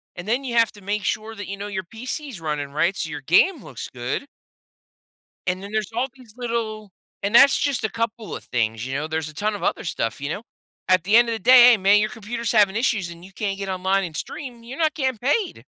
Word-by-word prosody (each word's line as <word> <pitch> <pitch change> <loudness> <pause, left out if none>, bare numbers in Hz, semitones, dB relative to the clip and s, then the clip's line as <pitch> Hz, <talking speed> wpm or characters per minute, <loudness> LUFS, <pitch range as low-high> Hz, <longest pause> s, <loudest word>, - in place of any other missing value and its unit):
And 175 - -8
then 245 +5 +1
you 245 -3 -4
have 230 -1 +4
to 205 - -16
make 205 +1 -2
sure 220 +3 -2
that, 205 -2 -7
you 200 - -5
know, 200 +1 -5
your 195 -2 -3
PC's 250 - -6
running 150 -3 -3
right 170 +6 +1
so 160 - -3
your 160 -2 -6
game 225 - +3
looks 125 - -8
good 125 - -3 1.2
and 185 +1 -1
then 200 - -8
there's 215 -2 -2
all 245 +3 +1
these 245 -5 -15
little 225 -4 -3 0.3
and 200 +2 -1
that's 275 +4 +7
just 280 -4 0
a 220 - +1
couple 230 -1 -3
of - - -8
things, 110 -1 -1
you 130 - -4
know, 150 +3 -2
there's 160 -1 -2
a - - -12
ton 210 +6 -1
of 205 - -7
other - - 0
stuff, 115 - -3
you 140 - -3
know? 200 +7 -4 0.5
At 185 -2 +4
the 205 +4 +3
end 235 0 +5
of - - 0
the - - -5
day, 250 +3 +8
"Hey 235 - +5
man, 200 +1 +5
your 215 +1 +1
computer's 225 +1 -4
having 205 -3 +4
issues, 220 -6 0
and 170 +1 -12
you 195 - -15
can't 200 -2 -2
get 195 -1 -4
online 190 +1 +1
and 165 -3 -8
stream, 245 -5 -7
you're 250 +4 -8
not 315 -2 +2
getting 260 -5 -1
paid." 315 - 0
210 Hz, 245 wpm, -23 LUFS, 180-235 Hz, 1.2 s, day